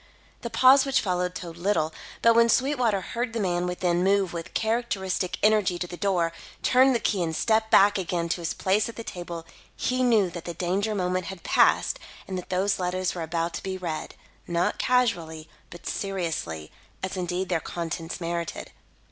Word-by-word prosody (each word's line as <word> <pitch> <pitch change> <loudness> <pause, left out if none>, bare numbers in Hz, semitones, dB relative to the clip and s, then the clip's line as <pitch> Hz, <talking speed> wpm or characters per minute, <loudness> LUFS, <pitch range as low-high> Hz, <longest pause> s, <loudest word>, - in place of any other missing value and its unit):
The 235 - -4
pause 265 +3 +6
which 270 -1 +2
followed 180 -2 -1
told 170 -2 -7
little; 170 -4 0 0.3
but 230 - +7
when 235 0 +5
Sweetwater 250 -6 +2
heard 235 +4 -3
the 230 - -2
man 180 -3 0
within 180 -1 0
move 195 -2 +2
with 165 -1 -7
characteristic 220 -5 -1
energy 210 -4 +3
to 180 - -3
the 175 - -8
door, 175 -4 +1 0.3
turn 260 +1 +5
the 235 - +1
key 200 -4 0
and 160 -2 -1
step 220 +4 +2
back 205 -1 +6
again 175 -2 -1
to 170 - -1
his 165 - -2
place 205 +4 +1
at 230 - -9
the 230 - -6
table, 175 -4 -6 0.3
he 255 0 0
knew 220 -7 +3
that 170 0 -8
the 170 - -5
danger 195 +5 -1
moment 185 -1 -1
had 190 -2 -8
passed - - +3 0.3
and 190 - -4
that 180 - -6
those 190 +2 +1
letters 180 0 -1
were 175 - -5
about 165 +1 -2
to - - -4
be 190 -1 -4
read, 170 -4 -5 0.3
not 175 0 0
casually, 170 -11 +1 0.2
but 175 - -12
seriously, 165 - -3 0.3
as 190 - -3
indeed 180 0 -2
their 175 -3 +1
contents 165 0 -5
merited. 170 -1 -4
185 Hz, 185 wpm, -26 LUFS, 170-215 Hz, 0.3 s, but